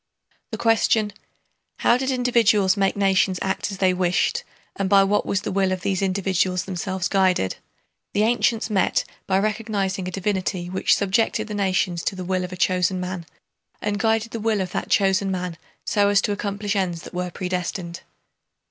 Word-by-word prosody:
The - - -5
question: 220 -2 +2 0.7
how 235 - +5
did 260 +1 -1
individuals 235 -6 +3
make 195 -1 +1
nations 190 -1 +2
act 190 +1 -1
as 195 - -6
they 185 -1 +3
wished 180 - +1 0.3
and 195 -1 -1
by 195 -1 +6
what 205 +1 +1
was 200 - 0
the - - -4
will 190 -1 +1
of 185 -1 -2
these 190 0 -1
individuals 185 -1 0
themselves 185 0 -2
guided? 185 - +1 0.6
the 205 - +2
ancients 230 -1 +1
met 190 -3 +2 0.2
by 190 - +2
recognizing 200 -3 -1
a - - -4
divinity 185 -2 -2
which 190 - +3
subjected 215 +2 +1
the - - -4
nations 185 -4 0
to - - -1
the 185 -1 -6
will 185 0 0
of 180 - -6
a 185 - -7
chosen 185 0 +1
man, 180 -2 -5 0.5
and 205 -1 -2
guided 225 +1 +1
the 230 - -4
will 220 -1 +1
of 185 -2 -3
that - - -3
chosen 195 0 +2
man 180 -2 -3 0.3
so 205 -1 +2
as 205 -1 +4
to 210 - -1
accomplish 205 0 -2
ends 175 -4 -1
that - - -11
were 180 0 -2
predestined. 180 -1 -4
195 Hz, 180 wpm, -23 LUFS, 185-205 Hz, 0.7 s, by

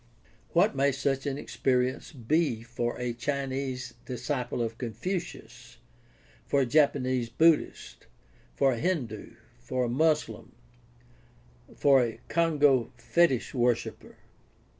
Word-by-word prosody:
What 170 - +3
may 140 +1 +3
such 135 +1 -1
an 135 -1 -2
experience 130 -2 -1
be 135 -2 0
for 120 0 -3
a 125 -1 -2
Chinese 135 0 -3
disciple 125 0 -3
of 115 0 -5
Confucius, 120 - -6 0.7
for 140 - +2
a - - +2
Japanese 130 -3 +2
Buddhist, 150 - +1 0.5
for 135 -1 +3
a 115 - -4
Hindu, 125 - -3 0.2
for 125 +1 -2
a 120 - -1
Moslem, 150 -4 0 1.2
for 140 -2 +5
a 115 -2 -4
Congo 145 -7 +3
fetish 130 +1 +1
worshiper? 120 -2 -1
130 Hz, 110 wpm, -28 LUFS, 120-145 Hz, 1.2 s, for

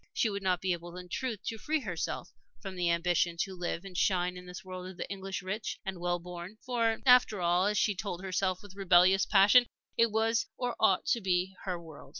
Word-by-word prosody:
She 220 - +1
would 200 0 -4
not 185 -2 +1
be 185 -1 +1
able 175 +1 -7
in 180 0 -9
truth 235 -1 -3
to 225 - -4
free 310 +4 0
herself 180 -8 -4 0.3
from 195 -3 -7
the 175 -1 0
ambition 170 0 +1
to 195 - -3
live 175 0 -4
and 190 -2 -10
shine 180 -1 +1
in 180 0 -10
this 180 +1 -9
world 185 0 -7
of 185 - -11
the - - -4
English 195 -1 -5
rich 210 +4 -4
and 190 -2 -4
well 175 0 0
born. 175 +3 -9
For, 230 -3 +1
after 250 -5 +6
all, 175 +2 +2
as 210 0 0
she 210 - +2
told 185 -1 -5
herself 185 0 -1
with 205 -2 -12
rebellious 185 0 +4
passion, 210 +5 +6 0.3
it 230 0 +4
was 225 +3 +1
or 245 -1 -2
ought 195 -4 +3
to 235 - +1
be 185 0 0
her 180 -2 -2
world. 160 -3 -12
190 Hz, 220 wpm, -31 LUFS, 180-210 Hz, 0.3 s, after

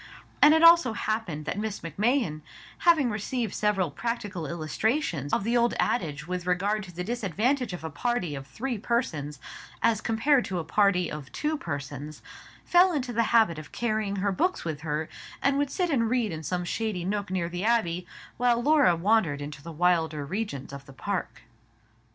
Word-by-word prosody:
And 300 +2 +8
it 320 - +3
also 335 -8 +7
happened 210 -9 -3
that 185 - -3
Miss 215 -1 -3
Macmahon, 195 - 0 0.4
having 315 -8 +4
received 220 +1 -2
several 195 -6 +1
practical 205 -3 -4
illustrations 170 - -1
of - - +1
the 230 +3 0
old 240 0 +3
adage 150 -9 -1
with 180 0 -4
regard 200 +4 +1
to 180 - -11
the 180 +1 -5
disadvantage 235 - 0
of 180 -2 -7
a 160 - -3
party 240 -4 -1
of 135 -1 -7
three 235 - -4
persons 160 - -2 0.5
as 220 -2 +3
compared 245 +5 +2
to 185 - -3
a 170 - -2
party 190 +1 +2
of 150 -3 -7
two 310 +1 -1
persons, 145 - -6 0.4
fell 360 +1 +5
into 260 -6 -2
the 230 - +2
habit 220 -9 +4
of 155 - -11
carrying 215 -4 -1
her 200 +1 0
books 360 - 0
with 155 -3 -4
her, 155 0 -2 0.3
and 275 0 +2
would 285 -1 +1
sit 355 +3 -1
and 230 -5 +2
read 240 -4 +1
in 160 -1 -5
some 180 +3 -2
shady 200 -2 -2
nook 200 0 -2
near 185 -2 -1
the 175 +2 -4
abbey, 180 -6 +1 0.3
while 245 -1 +3
Laura 285 - +4
wandered 175 -5 +2
into 145 0 -7
the 165 +3 -8
wilder 160 -3 +1
regions 165 -6 -4
of 140 0 -9
the 135 - -12
park. 200 +7 -4
200 Hz, 180 wpm, -27 LUFS, 160-235 Hz, 0.5 s, And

